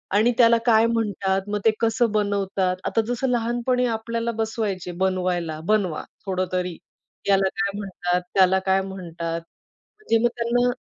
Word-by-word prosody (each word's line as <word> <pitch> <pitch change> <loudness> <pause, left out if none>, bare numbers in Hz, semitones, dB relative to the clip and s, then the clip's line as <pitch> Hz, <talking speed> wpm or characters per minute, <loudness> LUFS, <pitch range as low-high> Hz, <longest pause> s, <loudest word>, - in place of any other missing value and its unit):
आणि 220 +4 +4
त्याला 235 -1 +6
काय 225 -2 +5
म्हणतात, 200 -4 0
मग 210 0 -1
ते 225 - +7
कसं 230 0 +2
बनवतात? 200 -3 0
आता 225 - +2
जसं 245 +2 -1
लहानपणी 240 +1 +1
आपल्याला 230 +1 -2
बसवायचे 215 -5 -3
बनवायला, 180 -4 -1
बनवा. 195 -5 +1 0.2
थोडं 185 -1 -1
तरी 180 -2 -2 0.5
याला 195 -1 +4
काय 200 -1 -1
म्हणतात, 180 -3 -2
त्याला 190 -1 +5
काय 190 0 +3
म्हणतात. 170 -3 -5 0.6
म्हणजे 425 - +1
मग 240 - +4
त्यांना 240 +1 +2
205 Hz, 145 wpm, -23 LUFS, 185-230 Hz, 0.6 s, ते